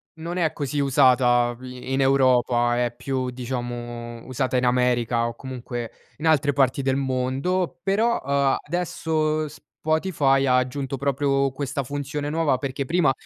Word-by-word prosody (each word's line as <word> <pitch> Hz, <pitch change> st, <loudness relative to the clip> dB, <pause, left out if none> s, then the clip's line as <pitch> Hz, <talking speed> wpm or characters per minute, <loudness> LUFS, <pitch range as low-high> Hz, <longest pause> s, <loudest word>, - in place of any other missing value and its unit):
Non 170 Hz, +3 st, -5 dB
è 160 Hz, -3 st, +1 dB
così 145 Hz, 0 st, -3 dB
usata 125 Hz, -3 st, +3 dB
i-in 130 Hz, +1 st, -4 dB
Europa, 125 Hz, -3 st, +3 dB
è 120 Hz, -, -4 dB
più 130 Hz, 0 st, -2 dB
diciamo 120 Hz, -2 st, -5 dB
usata 130 Hz, 0 st, -1 dB
in 125 Hz, -, +1 dB
America 125 Hz, -1 st, +2 dB
o 120 Hz, -, -5 dB
comunque 120 Hz, -2 st, -6 dB, 0.3 s
in 160 Hz, -, -2 dB
altre 145 Hz, -2 st, +3 dB
parti 135 Hz, 0 st, +2 dB
del 130 Hz, 0 st, +1 dB
mondo, 135 Hz, +7 st, -1 dB
però, 220 Hz, +5 st, +1 dB
uhm, 140 Hz, 0 st, +2 dB
adesso 155 Hz, -2 st, -1 dB
Spotify 150 Hz, -2 st, 0 dB
ha 125 Hz, -1 st, +4 dB
aggiunto 135 Hz, +1 st, -2 dB
proprio 140 Hz, 0 st, +1 dB
questa 140 Hz, +1 st, -3 dB
funzione 145 Hz, +2 st, -4 dB
nuova. 155 Hz, -4 st, +1 dB
Perché 135 Hz, 0 st, -3 dB
prima 170 Hz, -2 st, +3 dB
135 Hz, 140 wpm, -24 LUFS, 125-145 Hz, 0.3 s, ha